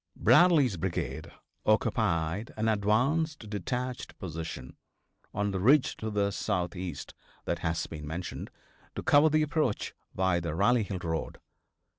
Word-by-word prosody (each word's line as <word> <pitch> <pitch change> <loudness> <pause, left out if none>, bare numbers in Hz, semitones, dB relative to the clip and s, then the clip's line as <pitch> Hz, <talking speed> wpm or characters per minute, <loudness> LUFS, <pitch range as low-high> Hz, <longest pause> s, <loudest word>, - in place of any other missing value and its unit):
Bradley's 135 - +5
brigade 90 +1 -3 0.3
occupied 105 -3 +1
an 110 +1 0
advanced, 125 +7 +1
detached 125 +5 -4
position, 80 -7 -6 0.6
on 105 0 -1
the 95 - -2
ridge 130 +8 +4
to 110 - -4
the 100 -1 0
southeast 90 -5 -3 0.3
that - - -1
has 80 0 -1
been 75 -2 -8
mentioned, 85 +4 -5 0.5
to - - -4
cover 145 +2 +5
the 155 0 +3
approach 150 -7 -1 0.2
by 95 -2 +2
the 85 -2 -3
Rally 120 +7 +3
Hill 100 -2 -3
road. 80 -1 -3
105 Hz, 130 wpm, -29 LUFS, 85-125 Hz, 0.6 s, Bradley's